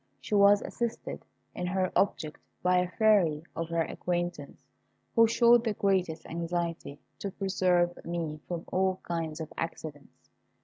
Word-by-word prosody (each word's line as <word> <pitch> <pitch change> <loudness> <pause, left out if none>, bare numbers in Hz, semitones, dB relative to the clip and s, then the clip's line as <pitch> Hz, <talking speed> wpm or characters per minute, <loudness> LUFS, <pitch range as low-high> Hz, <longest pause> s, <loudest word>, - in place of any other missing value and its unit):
She 135 - -7
was 200 0 +6
assisted 235 -1 -4 0.3
in 180 - -3
her 185 0 0
object 155 -6 0 0.2
by 180 0 +4
a 180 0 0
Fairy 185 -8 +3
of 165 0 -3
her 170 -1 +1
acquaintance, 175 -4 -3 0.6
who 230 -1 +7
showed 235 +1 +5
the 225 -3 0
greatest 185 -5 0
anxiety 170 -3 -3 0.2
to 200 - -3
preserve 180 -3 +1
me 165 -3 -3
from 175 -1 -4
all 185 0 +1
kinds 165 -2 -3
of 160 -1 -6
accidents. 155 -3 -7
175 Hz, 140 wpm, -29 LUFS, 165-195 Hz, 0.6 s, who